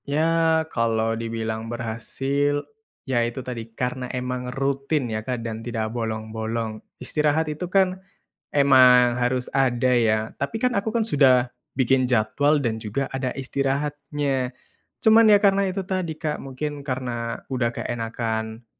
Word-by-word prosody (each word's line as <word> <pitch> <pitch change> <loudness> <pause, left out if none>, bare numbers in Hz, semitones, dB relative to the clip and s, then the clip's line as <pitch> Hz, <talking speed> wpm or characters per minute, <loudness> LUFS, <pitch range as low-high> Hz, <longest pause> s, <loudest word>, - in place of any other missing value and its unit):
Ya, 160 +1 +2
kalau 115 -1 +1
dibilang 115 0 -3
berhasil, 135 +5 -1 0.4
ya 130 -3 +1
itu 120 +2 -3
tadi, 115 -3 -6
karena 125 +2 -3
emang 125 0 -3
rutin 135 +2 -1
ya, 110 - -2
Kak, 120 0 -4
dan 110 -1 -4
tidak 115 -1 -3
bolong-bolong. 110 -1 -3 0.2
Istirahat 155 +1 +1
itu 170 +4 -5
kan, 185 -1 +2 0.5
emang 125 -3 +6
harus 125 +1 0
ada 130 -2 +2
ya. 110 -1 +1
Tapi 180 +11 -3
kan 250 -1 +1
aku 205 +2 -1
kan 235 - +1
sudah 135 - +4 0.2
bikin 130 0 +2
jadwal 130 +5 +2
dan 115 -5 -1
juga 110 +5 -3
ada 130 -1 -3
istirahatnya. 140 0 -2 0.5
Cuman 220 -1 +6
ya 205 - +6
karena 200 -1 +4
itu 190 0 -2
tadi, 185 -3 -2
Kak, 155 -3 -1
mungkin 145 +2 -5
karena 120 -3 -3
udah 125 -3 0
keenakan 115 -1 -3
130 Hz, 135 wpm, -24 LUFS, 115-145 Hz, 0.5 s, emang